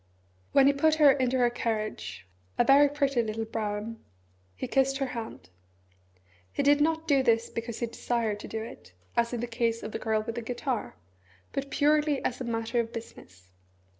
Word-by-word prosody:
When 275 Hz, -, +6 dB
he 280 Hz, -, +5 dB
put 310 Hz, +3 st, +3 dB
her 300 Hz, -3 st, +7 dB
into 260 Hz, -1 st, +1 dB
her 245 Hz, -1 st, +3 dB
carriage 215 Hz, -, -3 dB, 0.3 s
a -, -, +5 dB
very 280 Hz, +3 st, +6 dB
pretty 280 Hz, -3 st, +1 dB
little 225 Hz, 0 st, -3 dB
brougham 220 Hz, 0 st, -4 dB, 0.5 s
he 90 Hz, -, -4 dB
kissed 270 Hz, 0 st, +2 dB
her 270 Hz, -, 0 dB
hand. 225 Hz, -, -7 dB, 1.0 s
He -, -, -1 dB
did 290 Hz, +1 st, +4 dB
not 320 Hz, +1 st, +1 dB
do 280 Hz, -3 st, +4 dB
this 230 Hz, -2 st, +2 dB
because 230 Hz, 0 st, -5 dB
he -, -, +2 dB
desired 230 Hz, -2 st, -2 dB
to -, -, -8 dB
do 220 Hz, 0 st, -4 dB
it, 95 Hz, -, -11 dB, 0.2 s
as 235 Hz, 0 st, +2 dB
in 240 Hz, -2 st, -3 dB
the -, -, -1 dB
case 230 Hz, -1 st, -1 dB
of 215 Hz, -, -5 dB
the -, -, -4 dB
Girl 220 Hz, -1 st, 0 dB
with 230 Hz, +1 st, -4 dB
the 240 Hz, -, -4 dB
Guitar, 245 Hz, +1 st, -3 dB, 0.6 s
but 275 Hz, 0 st, -3 dB
purely 295 Hz, 0 st, +2 dB
as 255 Hz, -, -2 dB
a -, -, -3 dB
matter 230 Hz, +1 st, -1 dB
of 230 Hz, -1 st, -1 dB
business. 95 Hz, -, -11 dB
235 Hz, 190 wpm, -28 LUFS, 225-275 Hz, 1.0 s, her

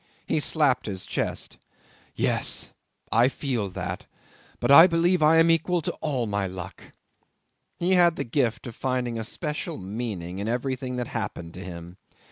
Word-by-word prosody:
He -, -, 0 dB
slapped 145 Hz, -6 st, +2 dB
his 95 Hz, -3 st, -4 dB
chest. -, -, -3 dB, 0.6 s
"Yes! -, -, 0 dB, 0.4 s
I 115 Hz, +2 st, +5 dB
feel 125 Hz, -7 st, -2 dB
that, 90 Hz, -1 st, -5 dB, 0.5 s
but -, -, +1 dB
I 165 Hz, +5 st, +10 dB
believe 175 Hz, 0 st, +2 dB
I 155 Hz, +2 st, +6 dB
am 165 Hz, +1 st, +6 dB
equal 170 Hz, +2 st, +2 dB
to -, -, -1 dB
all 135 Hz, -6 st, -1 dB
my 100 Hz, -2 st, -1 dB
luck!" 90 Hz, -1 st, -8 dB, 0.9 s
He 175 Hz, +2 st, 0 dB
had 175 Hz, -2 st, +5 dB
the -, -, -2 dB
gift 120 Hz, -1 st, -1 dB
of 120 Hz, -3 st, -7 dB
finding 125 Hz, -3 st, -2 dB
a -, -, -3 dB
special 150 Hz, +7 st, -4 dB
meaning 95 Hz, -3 st, -5 dB
in 100 Hz, -, -3 dB
everything 125 Hz, +1 st, -2 dB
that 125 Hz, -1 st, -3 dB
happened 105 Hz, -7 st, -5 dB
to -, -, -9 dB
him. 85 Hz, 0 st, -9 dB
125 Hz, 160 wpm, -26 LUFS, 100-150 Hz, 0.9 s, I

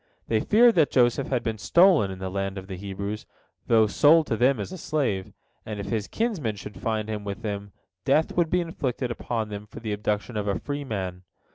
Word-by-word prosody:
They 110 Hz, -, +3 dB
feared 230 Hz, -, +5 dB
that 160 Hz, -6 st, +4 dB
Joseph 125 Hz, +1 st, +2 dB
had 125 Hz, -3 st, -1 dB
been 110 Hz, -2 st, -3 dB
stolen 170 Hz, -, +5 dB
in 95 Hz, -, -6 dB
the 95 Hz, 0 st, -5 dB
land 100 Hz, 0 st, -2 dB
of 95 Hz, -, -6 dB
the 95 Hz, -1 st, -6 dB
Hebrews, 100 Hz, +2 st, -5 dB, 0.4 s
though 110 Hz, -2 st, +5 dB
sold 150 Hz, -, +5 dB
to 115 Hz, -, -1 dB
them 125 Hz, +2 st, +3 dB
as 100 Hz, -, -4 dB
a 185 Hz, -, -6 dB
slave, 120 Hz, -, -1 dB, 0.3 s
and 105 Hz, -2 st, -6 dB
if 100 Hz, 0 st, -5 dB
his 110 Hz, -2 st, -1 dB
kinsmen 185 Hz, -, -1 dB
should 100 Hz, -1 st, -9 dB
find 110 Hz, -1 st, -1 dB
him 105 Hz, -1 st, -4 dB
with 100 Hz, +2 st, -6 dB
them, 100 Hz, -2 st, -4 dB, 0.3 s
death 160 Hz, -, +2 dB
would 170 Hz, -2 st, +2 dB
be 180 Hz, +2 st, +2 dB
inflicted 130 Hz, -7 st, -3 dB
upon 115 Hz, -2 st, -3 dB
them 105 Hz, 0 st, -7 dB
for -, -, -10 dB
the 110 Hz, -2 st, -3 dB
abduction 105 Hz, +2 st, -2 dB
of 105 Hz, -1 st, -2 dB
a 100 Hz, -, +1 dB
free 145 Hz, 0 st, -4 dB
man. 95 Hz, -7 st, -4 dB
110 Hz, 220 wpm, -26 LUFS, 100-140 Hz, 0.4 s, feared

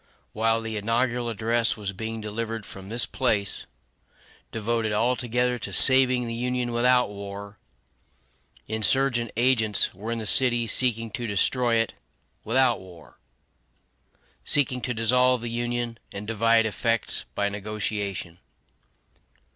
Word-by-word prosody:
While 115 Hz, +1 st, +1 dB
the 110 Hz, -1 st, -5 dB
inaugural 120 Hz, +3 st, -1 dB
address 115 Hz, +1 st, 0 dB
was 100 Hz, -2 st, -5 dB
being 110 Hz, +3 st, -5 dB
delivered 110 Hz, +1 st, -4 dB
from 95 Hz, +1 st, -11 dB
this 115 Hz, +2 st, +1 dB
place, 105 Hz, -6 st, 0 dB, 0.8 s
devoted 115 Hz, 0 st, -1 dB
altogether 125 Hz, +2 st, 0 dB
to -, -, -6 dB
saving 130 Hz, -1 st, +6 dB
the 115 Hz, -, -4 dB
Union 125 Hz, +1 st, -2 dB
without 125 Hz, 0 st, +3 dB
war, 100 Hz, 0 st, -9 dB, 1.1 s
insurgent 120 Hz, +2 st, +1 dB
agents 115 Hz, -4 st, +2 dB
were 105 Hz, +5 st, -6 dB
in 115 Hz, -, -2 dB
the 110 Hz, -, -5 dB
city 120 Hz, +1 st, +4 dB
seeking 115 Hz, -1 st, +1 dB
to 120 Hz, +1 st, -4 dB
destroy 115 Hz, +4 st, +1 dB
it 115 Hz, 0 st, 0 dB, 0.5 s
without 125 Hz, +1 st, +2 dB
war 90 Hz, -3 st, -15 dB, 1.2 s
seeking 130 Hz, -3 st, +1 dB
to 125 Hz, -, -2 dB
dissolve 125 Hz, +2 st, +2 dB
the 120 Hz, 0 st, -5 dB
Union, 120 Hz, 0 st, -3 dB
and 100 Hz, +1 st, -7 dB
divide 115 Hz, +1 st, +2 dB
effects, 115 Hz, +1 st, -1 dB
by 100 Hz, -, 0 dB
negotiation. 100 Hz, -3 st, -4 dB
115 Hz, 125 wpm, -25 LUFS, 105-120 Hz, 1.2 s, saving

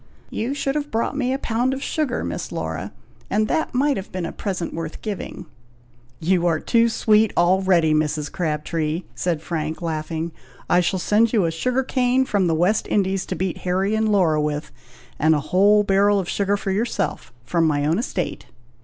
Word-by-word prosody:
"You 245 Hz, +6 st, -2 dB
should 275 Hz, -1 st, -1 dB
have 295 Hz, 0 st, -2 dB
bought 230 Hz, +3 st, -1 dB
me 260 Hz, -3 st, 0 dB
a 265 Hz, -, 0 dB
pound 250 Hz, +1 st, 0 dB
of 275 Hz, -, -6 dB
sugar, 290 Hz, -6 st, -1 dB
Miss -, -, -4 dB
Laura, -, -, -4 dB, 0.4 s
and 215 Hz, +1 st, +1 dB
that 315 Hz, -2 st, -1 dB
might 280 Hz, +2 st, +2 dB
have 195 Hz, -, -7 dB
been 185 Hz, -2 st, -3 dB
a -, -, -4 dB
present 185 Hz, -4 st, -4 dB
worth 165 Hz, -1 st, -6 dB
giving." 210 Hz, -4 st, -5 dB, 0.7 s
"You 175 Hz, +1 st, +2 dB
are 160 Hz, -2 st, +2 dB
too 230 Hz, +4 st, +3 dB
sweet 220 Hz, -1 st, +3 dB
already, 175 Hz, -2 st, +3 dB
Mrs. 150 Hz, -1 st, 0 dB
Crabtree!" 155 Hz, 0 st, -2 dB
said 165 Hz, -3 st, -2 dB
Frank, 155 Hz, -2 st, -3 dB
laughing. 160 Hz, 0 st, -3 dB, 0.4 s
"I 175 Hz, -, +4 dB
shall 180 Hz, +2 st, +1 dB
send 215 Hz, +5 st, +2 dB
you 210 Hz, -6 st, +3 dB
a 165 Hz, -, 0 dB
sugar 255 Hz, +10 st, 0 dB
cane 255 Hz, 0 st, +2 dB
from 200 Hz, -6 st, +1 dB
the 165 Hz, -, +2 dB
West 180 Hz, +7 st, +1 dB
Indies, 195 Hz, -2 st, 0 dB
to -, -, -3 dB
beat 185 Hz, -2 st, -2 dB
Harry 190 Hz, +3 st, 0 dB
and 220 Hz, 0 st, +1 dB
Laura 165 Hz, -7 st, +3 dB
with, 150 Hz, 0 st, -3 dB, 0.5 s
and 155 Hz, +1 st, +4 dB
a -, -, +1 dB
whole 205 Hz, +3 st, +5 dB
barrel 200 Hz, +1 st, +3 dB
of 185 Hz, -, -3 dB
sugar 200 Hz, +2 st, 0 dB
for 195 Hz, -, -3 dB
yourself, 205 Hz, -, -2 dB
from 165 Hz, +7 st, +1 dB
my 145 Hz, -2 st, +1 dB
own 160 Hz, +6 st, +2 dB
estate." 195 Hz, -7 st, -3 dB
190 Hz, 190 wpm, -22 LUFS, 165-220 Hz, 0.7 s, whole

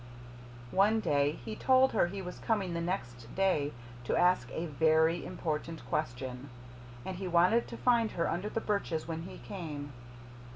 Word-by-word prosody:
One 205 Hz, +4 st, +4 dB
day 145 Hz, -7 st, +2 dB
he 110 Hz, -1 st, -4 dB
told 260 Hz, -, +4 dB
her 195 Hz, -5 st, +3 dB
he 195 Hz, +2 st, -5 dB
was 180 Hz, 0 st, -7 dB
coming 200 Hz, -6 st, 0 dB
the 170 Hz, -, -2 dB
next 120 Hz, -10 st, -4 dB
day 185 Hz, -7 st, +2 dB, 0.3 s
to -, -, 0 dB
ask 180 Hz, -9 st, +3 dB
A 165 Hz, -, -3 dB
VERY 160 Hz, +1 st, +3 dB
IMPORTANT 160 Hz, +2 st, -4 dB
QUESTION, 130 Hz, -1 st, -3 dB, 0.6 s
and 185 Hz, -1 st, -4 dB
he 190 Hz, 0 st, -4 dB
wanted 180 Hz, +7 st, +4 dB
to -, -, -7 dB
find 235 Hz, -3 st, +2 dB
her 170 Hz, -, 0 dB
under 190 Hz, +5 st, -2 dB
the 225 Hz, -, -2 dB
birches 200 Hz, -8 st, -1 dB
when 165 Hz, -1 st, -3 dB
he 170 Hz, -, -8 dB
came. 150 Hz, -7 st, -6 dB
170 Hz, 165 wpm, -32 LUFS, 150-195 Hz, 0.6 s, One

